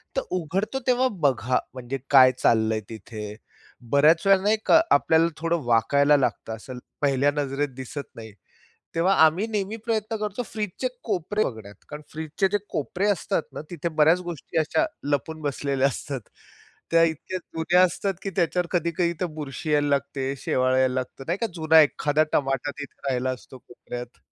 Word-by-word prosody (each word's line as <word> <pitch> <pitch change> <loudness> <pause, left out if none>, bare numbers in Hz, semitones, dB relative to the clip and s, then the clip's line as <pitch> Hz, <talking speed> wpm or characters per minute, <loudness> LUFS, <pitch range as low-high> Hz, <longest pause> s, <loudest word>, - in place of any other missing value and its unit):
तर - - +1 0.2
उघडतो 190 - -2
तेव्हा 255 +1 +3 0.2
बघा 125 -2 +2
म्हणजे 130 +1 -5
काय 130 -2 +8
चाललंय 110 -1 +2
तिथे. 105 -1 -8 0.6
बऱ्याच 155 +5 +5
वेळेला 195 -1 +5
नाही 215 +1 +3
का 330 - +6
आपल्याला 160 +1 +4
थोडं 165 -1 -1
वाकायला 140 +6 +4
लागतं, 120 -4 -1
असं 125 +3 -9 0.2
पहिल्या 140 0 +3
नजरेत 145 0 -1
दिसत 135 +2 -7
नाही. 110 -2 -10 0.6
तेव्हा 180 +4 +3
आम्ही 175 +8 +2
नेहमी 210 0 -2
प्रयत्न 225 -1 -1
करतो 210 +2 -3
फ्रीजचे 215 +3 -3 0.2
कोपरे 205 +1 -1
बघण्यात 110 -4 -6
कारण 150 +1 -8
फ्रीजचे 160 +5 -1
जे 205 - +3
कोपरे 175 +7 -2
असतात 195 - 0
ना, - - -6
तिथे 170 -1 -3
बऱ्याच 160 +4 +5
गोष्टी 165 -1 -4
अशा 160 - +2 0.3
लपून 155 +3 -1
बसलेल्या 140 -1 0
असतात. 135 0 -5 0.7
त्या 165 0 +5
इतक्या 165 +3 -3
जुन्या 175 +1 +1
असतात, 195 +2 -1
की 195 - -3
त्याच्यावर 175 0 +1
कधी-कधी 170 0 0
ते - - +1
बुरशी 150 +1 -4
यायला 145 -1 +3
लागते, 140 -1 -1
शेवाळ 130 0 +1
यायला 130 -1 +2
लागतं 130 +1 -4
नाही 170 +4 -1
का, 230 - 0
जुना 160 -1 +5
एखादा 150 0 +2
टमाटा 135 0 0
तिथे 145 -1 -9
राहिला 130 0 0
असतो 130 +1 -8
कोपऱ्यात. 120 0 -9
150 Hz, 160 wpm, -25 LUFS, 130-180 Hz, 0.7 s, काय